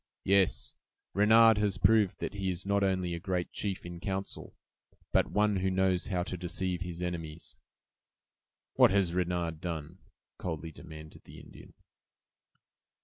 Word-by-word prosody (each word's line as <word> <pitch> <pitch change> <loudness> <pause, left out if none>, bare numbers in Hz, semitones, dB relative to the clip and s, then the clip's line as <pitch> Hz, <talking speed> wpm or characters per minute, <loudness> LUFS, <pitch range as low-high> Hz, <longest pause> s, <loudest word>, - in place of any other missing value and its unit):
Yes! 100 -1 +2 0.4
Renard 110 +2 +6
has 105 -2 +1
proved 105 -1 +3
that - - -3
he 100 -2 -2
is 90 +1 -3
not 100 0 +1
only 95 -3 0
a 85 - -3
great 90 -1 -2
chief 100 -2 -4
in 85 0 -7
council, 95 0 -4 0.6
but - - +3
one 105 -1 +2
who 95 +1 0
knows 95 -1 +1
how 90 -4 -1
to 90 - -5
deceive 90 0 -3
his 90 -1 -5
enemies!" 85 -2 -6 1.2
"What - - +6
has 95 -3 +2
Renard 85 -3 -1
done?" 85 0 -5 0.4
coldly 80 -2 -4
demanded 80 0 -12
the - - -12
Indian. - - -15
90 Hz, 145 wpm, -30 LUFS, 85-100 Hz, 1.2 s, Renard